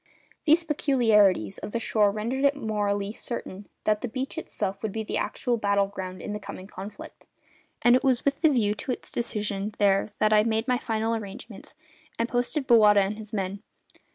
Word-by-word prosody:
These 320 +2 +5
peculiarities 225 - +3
of - - -7
the 235 - 0
shore 210 -3 +2
rendered 230 +6 -2
it 280 0 +4
morally 205 -4 -1
certain 205 -4 -6
that 215 -1 +1
the - - -2
beach 260 +3 -4
itself 195 -10 -4
would 220 - -2
be 220 +2 -3
the - - -3
actual 245 -2 -1
battle 200 -2 +2
ground 185 -2 -7
in 210 - -4
the 210 - -4
coming 200 -2 -8
conflict; 195 +1 -10 0.6
and 240 0 +6
it 255 - +1
was 260 -3 +2
with 280 +1 0
the 320 - +6
view 220 -7 +2
to 215 - -4
its - - -6
decision 210 -3 -2
there 200 0 +3
that 215 0 +3
I 210 0 +6
made 225 0 0
my 250 -1 +2
final 225 -2 -1
arrangements, 210 0 -8 0.4
and 230 - 0
posted 245 +4 -1
Bowata 210 -4 +6
and 200 +3 -2
his 215 -1 -9
men. 195 -1 -3
215 Hz, 190 wpm, -26 LUFS, 200-245 Hz, 0.6 s, and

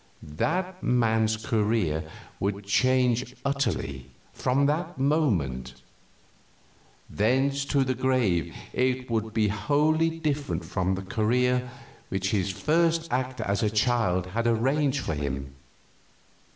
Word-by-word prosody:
That 180 - -2
man's 110 -2 +2
career 105 -8 0 0.3
would 100 +1 -2
change 125 +2 +2
utterly, 140 - -1 0.3
from 135 +3 +1
that 160 +4 -1
moment; 90 - 0 1.3
thence 135 +6 +1
to 140 -1 +2
the 130 0 0
grave 120 -11 +1 0.2
it 125 -1 0
would 110 -1 -1
be 110 -1 +1
wholly 150 +9 +2
different 150 -3 -2
from 95 0 -1
the 95 - -5
career 125 +5 +1 0.4
which 95 +1 -1
his 100 -2 0
first 165 - +1
act 130 0 -1
as 100 0 0
a 110 - +2
child 105 -5 +1
had 115 +6 -2
arranged 135 +5 +1
for 80 - -2
him. 70 -2 -4
120 Hz, 115 wpm, -27 LUFS, 100-140 Hz, 1.3 s, man's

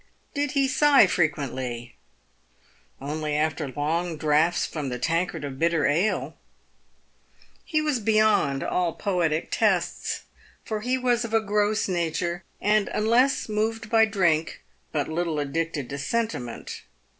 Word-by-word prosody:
Did 285 -1 -1
he 275 -2 +3
sigh 290 -3 +5
frequently? 130 -8 -2 1.1
Only 150 +2 -3
after 155 -1 0
long 160 +5 -2
draughts 155 +3 +2
from 150 -4 -4
the 125 - -3
tankard 165 +5 -1
of 135 -2 -6
bitter 165 -2 +2
ale. 170 +9 0 1.3
He 310 -1 0
was 295 -5 0
beyond 215 -10 +2
all 175 -2 0
poetic 170 -6 -1
tests, - - 0 0.4
for 215 -1 -3
he 250 +3 0
was 245 -2 +1
of 225 -1 -2
a - - +6
gross 210 0 +1
nature, 175 0 -2 0.2
and, 210 0 +2
unless 235 +5 +2
moved 220 +1 -2
by 225 -1 +6
drink, 170 -7 0 0.3
but 145 -3 -1
little 165 0 -2
addicted 145 -1 -2
to 140 - -4
sentiment. 145 - -3
175 Hz, 130 wpm, -25 LUFS, 150-220 Hz, 1.3 s, a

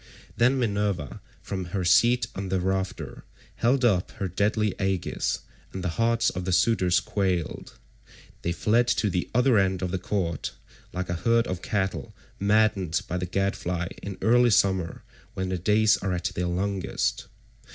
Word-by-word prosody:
Then 125 +3 +3
Minerva 100 - -1 0.2
from 95 -2 -4
her 90 +1 -3
seat 120 +8 +4
on 95 0 -5
the 95 0 +1
rafter 95 -7 -3 0.3
held 125 +2 +2
up 95 -6 +2
her 100 -3 -3
deadly 105 +2 0
aegis, 95 -2 -1 0.3
and 95 - -6
the 90 - 0
hearts 115 0 +2
of 90 - -5
the 95 - -2
suitors 90 -2 +3
quailed. 95 -5 -2 0.6
They 85 - -1
fled 110 +7 +2
to 105 -4 +1
the 90 - -2
other 125 -3 +4
end 95 -1 0
of 90 - -2
the 95 - -1
court 90 -5 -2 0.4
like 90 0 -4
a - - 0
herd 115 0 +3
of 90 -1 -4
cattle 95 -8 -2 0.2
maddened 100 -4 +2
by 90 - -2
the 90 0 -3
gadfly 90 -2 -1
in 100 -2 -6
early 120 +2 +5
summer 95 -5 +1 0.3
when 95 0 -2
the 95 -1 -2
days 105 +3 +4
are 95 -2 -2
at 90 0 -3
their 90 0 -2
longest. 95 +2 -1
95 Hz, 160 wpm, -26 LUFS, 90-110 Hz, 0.6 s, early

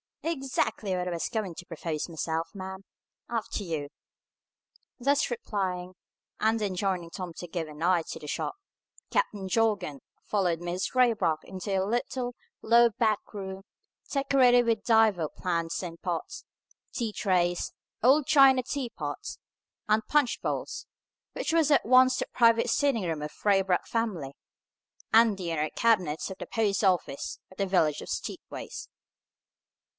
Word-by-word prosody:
"Ex 275 -5 -3
actly 210 -3 0
what 180 0 -2
I - - -2
was 170 -1 -2
going 215 -6 -2
to 175 - -9
propose 160 -2 -4
myself, 165 0 -2
ma'am. 190 0 -7 0.4
After 225 -2 -3
you." 155 -5 -3 1.1
Thus 280 +3 +2
replying, 185 - -3 0.5
and 220 +1 +2
enjoining 185 -3 -1
Tom 180 -3 -6
to 175 - -6
give 165 -1 -3
an 150 +1 -8
eye 175 -1 +3
to - - -5
the 150 - -9
shop, 145 - -3 0.6
Captain 210 - 0
Jorgan 190 -8 +1 0.2
followed 180 -5 0
Mrs. 175 +6 -3
Raybrock 225 -11 +3
into 190 +2 -6
the 190 -1 +1
little, 245 +3 -2 0.3
low 235 +1 +6
back 215 -1 +1
room, 190 -1 -6 0.5
decorated 260 -3 +4
with 225 -2 +1
divers 220 -9 +4
plants 170 -1 -1
in 170 -2 -6
pots, 185 - -4 0.5
tea 235 -5 -2
trays, 175 -3 +1 0.3
old 270 +5 +5
china 270 -3 +6
teapots, 260 -1 -4 0.5
and 215 +1 +3
punch 295 -5 +2
bowls, - - -3 0.5
which - - -2
was 325 -3 +4
at 285 - +4
once 255 +2 +6
the - - -1
private 230 0 +4
sitting 250 -2 +2
room 165 -4 -2
of 150 - -3
the 210 - -2
Raybrock 195 -2 +3
family 195 -12 -2 0.8
and 225 -2 +6
the 175 -3 -3
inner 155 -1 0
cabinet 185 -10 +1
of 190 - -7
the - - -6
post 215 -2 0
office 180 -7 0
of 185 - -16
the 195 - 0
village 160 -6 +2
of - - -9
Steepways. - - -6
195 Hz, 150 wpm, -28 LUFS, 175-235 Hz, 1.1 s, low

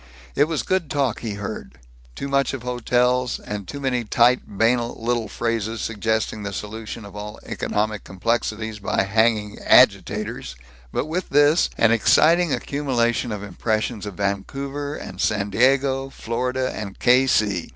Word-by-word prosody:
It 145 - +4
was 160 -2 -2
good 185 -5 0
talk 135 -5 0
he 110 -4 -4
heard; 100 -10 -7 0.4
too 140 - -4
much 140 -1 +1
of 125 - -8
hotels, 125 0 +1
and 105 -2 -6
too 140 - -6
many 130 -3 0
tight 120 +3 +4
banal 115 +3 +1
little 115 -1 -1
phrases 115 -1 -2
suggesting 110 0 -1
the 100 -1 -5
solution 110 +1 -6
of 100 0 -12
all 105 0 -7
economic 105 0 -2
complexities 110 +2 -2
by 100 - 0
hanging 105 0 +1
"agitators," - - +3 0.4
but - - -1
with 170 +4 -3
this, 145 +3 +4
an 115 - +4
exciting 160 +9 +4
accumulation 125 -5 0
of 105 -1 -4
impressions 110 +2 -2
of 100 - -7
Vancouver 135 +9 -3
and - - -7
San 105 -1 0
Diego, 135 +3 +2
Florida 125 +1 -2
and 100 -3 -6
K. 130 +2 +4
C. 100 -8 +1
115 Hz, 150 wpm, -22 LUFS, 105-130 Hz, 0.4 s, It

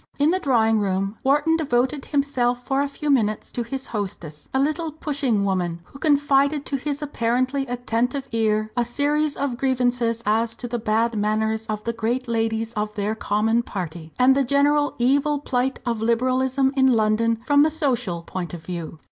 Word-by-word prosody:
In 290 +3 +3
the 375 - +1
drawing 225 -8 +2
room 195 +1 -1
Wharton 295 +4 +3
devoted 270 -1 0
himself 250 -4 0
for 270 +1 +1
a 285 - 0
few 290 +1 -2
minutes 215 -5 +1
to 240 - -3
his 265 +3 -5
hostess, 175 -8 -6
a 265 - 0
little 310 +3 0
pushing 275 -9 -1
woman, 175 -3 -1
who 275 - -15
confided 285 -1 +2
to 275 - -2
his 290 +2 -4
apparently 255 0 0
attentive 245 +2 -2
ear 215 -1 0
a 240 - +2
series 290 +4 0
of 275 -4 -2
grievances 245 -3 0
as 225 +2 +1
to 245 - -6
the 240 0 -3
bad 225 +1 +1
manners 220 +1 0
of 215 -1 -3
the 230 - -2
great 235 +3 -2
ladies 225 0 -1
of 210 -1 -3
their 210 +1 -1
common 220 +2 +1
party, 170 -7 -6
and 255 +1 +5
the 275 - +3
general 290 +2 +2
evil 280 +4 +2
plight 265 -2 -1
of 230 -3 -1
Liberalism 255 +3 +1
in 265 -1 +4
London 225 +1 +2
from 285 +1 +4
the 310 - +5
social 245 - -1
point 175 -1 -5
of 160 -2 -11
view. 170 -3 -6
245 Hz, 180 wpm, -23 LUFS, 220-275 Hz, -, and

